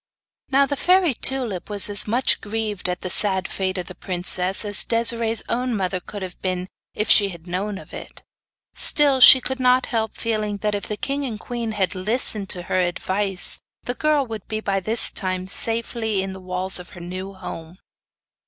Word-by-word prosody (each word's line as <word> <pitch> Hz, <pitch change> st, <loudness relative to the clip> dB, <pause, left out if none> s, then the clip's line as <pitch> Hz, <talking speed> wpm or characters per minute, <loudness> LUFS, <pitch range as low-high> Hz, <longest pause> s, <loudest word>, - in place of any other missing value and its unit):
Now 275 Hz, +1 st, +4 dB
the 285 Hz, -, -3 dB
fairy 360 Hz, 0 st, +2 dB
Tulip 240 Hz, -8 st, 0 dB
was 205 Hz, -2 st, +3 dB
as 205 Hz, 0 st, +1 dB
much 240 Hz, +5 st, +2 dB
grieved 210 Hz, -3 st, -4 dB
at 180 Hz, -, -4 dB
the 185 Hz, -, -4 dB
sad 190 Hz, -2 st, +2 dB
fate 190 Hz, -1 st, -3 dB
of 180 Hz, -, -4 dB
the 185 Hz, -, -9 dB
princess 185 Hz, +2 st, +1 dB
as 205 Hz, -1 st, +3 dB
Desiree's 230 Hz, -1 st, +2 dB
own 250 Hz, 0 st, -1 dB
mother 185 Hz, -1 st, -2 dB
could 200 Hz, +2 st, -8 dB
have 180 Hz, -1 st, -9 dB
been 185 Hz, 0 st, -3 dB, 0.3 s
if 210 Hz, -, -2 dB
she 200 Hz, -2 st, +5 dB
had 170 Hz, -3 st, -10 dB
known 190 Hz, +3 st, -4 dB
of -, -, -13 dB
it. -, -, -10 dB, 0.5 s
Still, 285 Hz, -3 st, +4 dB
she 260 Hz, -, +10 dB
could 265 Hz, +1 st, -2 dB
not 255 Hz, 0 st, +3 dB
help 220 Hz, -1 st, -2 dB
feeling 215 Hz, -3 st, -2 dB
that 210 Hz, +1 st, -2 dB
if 205 Hz, -, -4 dB
the 210 Hz, -, -4 dB
king 280 Hz, +5 st, -3 dB
and 230 Hz, -6 st, -5 dB
queen 235 Hz, -2 st, -5 dB
had 190 Hz, -3 st, -1 dB
listened 205 Hz, 0 st, -1 dB
to 180 Hz, -, -2 dB
her 185 Hz, -, -1 dB
advice 185 Hz, +2 st, +1 dB, 0.2 s
the 245 Hz, -, -3 dB
girl 300 Hz, 0 st, +1 dB
would 220 Hz, -3 st, -7 dB, 0.2 s
by 195 Hz, -1 st, 0 dB
this 220 Hz, +5 st, +2 dB
time 185 Hz, -2 st, -2 dB
be 190 Hz, -, -6 dB
safely 225 Hz, -3 st, -2 dB
in 190 Hz, 0 st, -5 dB
the 190 Hz, -, -9 dB
walls 185 Hz, +1 st, +1 dB
of 180 Hz, -, -11 dB
her -, -, -8 dB
new 185 Hz, +3 st, -7 dB
home. 165 Hz, -2 st, -9 dB
205 Hz, 195 wpm, -22 LUFS, 185-235 Hz, 0.5 s, she